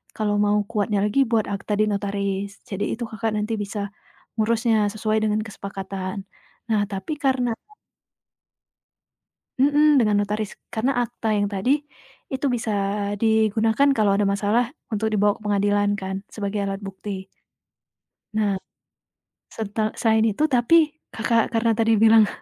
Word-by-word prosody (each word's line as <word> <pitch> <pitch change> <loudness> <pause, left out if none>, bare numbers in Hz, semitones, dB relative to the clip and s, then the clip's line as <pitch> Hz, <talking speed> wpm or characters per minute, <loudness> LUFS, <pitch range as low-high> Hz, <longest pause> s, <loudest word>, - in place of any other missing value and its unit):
kalau 210 -1 0
mau 205 0 +3
kuatnya 205 -1 0
lagi 210 +6 +1
buat 220 -2 +2
akta 200 +1 -3
di 215 - +4
notaris. 200 -1 -2 0.2
Jadi, 200 0 -3
itu 240 - -5
Kakak, 225 0 -2
nanti 210 +2 -2
bisa 200 +1 -5 0.6
ngurusnya 225 +1 +2 0.2
sesuai 215 0 0
dengan 215 0 +1
kesepakatan. 195 -1 -6 0.5
Nah, 215 -2 +2
tapi 195 +9 -4
karena 260 -3 +2 2.1
Mhm, 290 0 +5
dengan 210 -2 +2
notaris, 210 0 -4 0.2
karena 245 +3 0
akta 230 -1 -4
yang 205 - +2
tadi 250 +9 0 0.5
itu 265 +2 -2
bisa 235 -3 -1 0.5
digunakan 220 +3 +3
kalau 215 -5 +2
ada 205 - +2
masalah 210 +6 +1 0.2
untuk 220 0 -1
dibawa 205 0 +2
ke - - -24
pengadilan 205 0 +2
kan, 190 -1 -4 0.2
sebagai 200 -1 -2
alat 195 +1 -4
bukti. 195 0 -6 1.1
Nah 205 -3 +1 0.9
setel 215 0 -2
selain 220 -1 +3
itu 255 +9 0
tapi 300 +4 +3 0.2
Kakak, 230 0 +1
karena 230 0 +3
tadi 225 0 +3
bilang 220 0 +6
215 Hz, 135 wpm, -23 LUFS, 200-230 Hz, 2.1 s, bilang